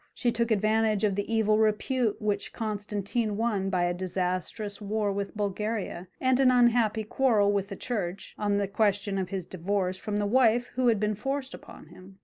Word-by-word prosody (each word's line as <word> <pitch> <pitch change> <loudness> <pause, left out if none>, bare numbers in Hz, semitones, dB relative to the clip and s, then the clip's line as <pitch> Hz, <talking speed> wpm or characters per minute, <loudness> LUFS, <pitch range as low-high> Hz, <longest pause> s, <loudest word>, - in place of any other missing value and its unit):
She 240 - +1
took 235 0 0
advantage 215 0 +2
of 205 -2 +3
the 205 +3 -3
evil 215 -1 +3
repute 220 +1 +1
which 205 -1 -2
Constantine 210 0 -2
won 210 -4 0
by 180 -2 +1
a 175 0 +1
disastrous 185 +3 -3
war 210 0 -1
with 200 +1 -4
Bulgaria, 205 -2 -3
and 260 0 +2
an 265 -2 +5
unhappy 240 -3 +3
quarrel 215 -3 +2
with 200 -1 -1
the 195 - -5
Church, 195 -5 -4
on 205 -1 0
the 200 -1 0
question 200 -1 +1
of 185 - -3
his 190 -3 -4
divorce 185 +1 -2
from 205 +1 -3
the 205 - 0
wife 240 +1 +3
who 255 0 +1
had 225 -3 +3
been 210 0 +1
forced 270 +6 -3
upon - - -12
him. 190 +1 -15
210 Hz, 185 wpm, -28 LUFS, 195-225 Hz, -, an